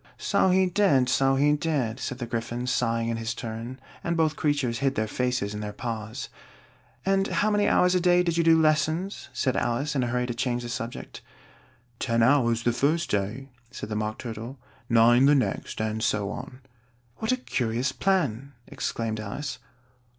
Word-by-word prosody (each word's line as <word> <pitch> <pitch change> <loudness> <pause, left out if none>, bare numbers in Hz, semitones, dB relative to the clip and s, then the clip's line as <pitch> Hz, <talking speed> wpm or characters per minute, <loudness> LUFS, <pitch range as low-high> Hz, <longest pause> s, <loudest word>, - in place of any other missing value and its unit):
"So - - +2
he 190 +1 +4
did, 180 -10 +3
so 135 +1 +3
he 145 +2 +3
did," 145 -7 -1
said 130 - -4
the 125 - -4
Gryphon, 120 +1 -3
sighing 115 -2 0
in 115 - -1
his 115 +1 -3
turn, 115 +3 -6 0.2
and 170 0 -1
both 155 -1 +2
creatures 140 -6 0
hid 135 -1 +1
their 110 - 0
faces 125 -2 -1
in 105 - -5
their 105 -1 -4
paws. 110 -1 -5 0.8
"And 195 0 +2
how 215 - +1
many 205 0 +2
hours 180 0 +4
a 180 - +3
day 180 0 +4
did 170 -2 0
you 170 - +2
do 165 0 +5
lessons?" 155 +5 +1
said 130 -2 0
Alice, 120 +5 0
in 135 - +1
a 120 - 0
hurry 125 +1 0
to 120 - -3
change 120 +1 -1
the 120 - -6
subject. 120 -1 -6 0.8
"Ten 115 0 +1
hours 120 -3 +3
the 120 - +2
first 150 +4 +1
day," 105 +7 -2 0.2
said 130 -4 -7
the 105 - -3
Mock 110 0 -2
Turtle: 115 +2 -7 0.3
"nine 120 +3 +6
the 145 - +6
next, 135 - -1
and 110 0 -2
so 105 -2 0
on." 130 +1 -8 0.6
"What 220 - -1
a 255 - +2
curious 125 - -1
plan!" 140 - 0
exclaimed 110 -1 -3
Alice. 125 +6 -5
125 Hz, 185 wpm, -26 LUFS, 115-150 Hz, 0.8 s, nine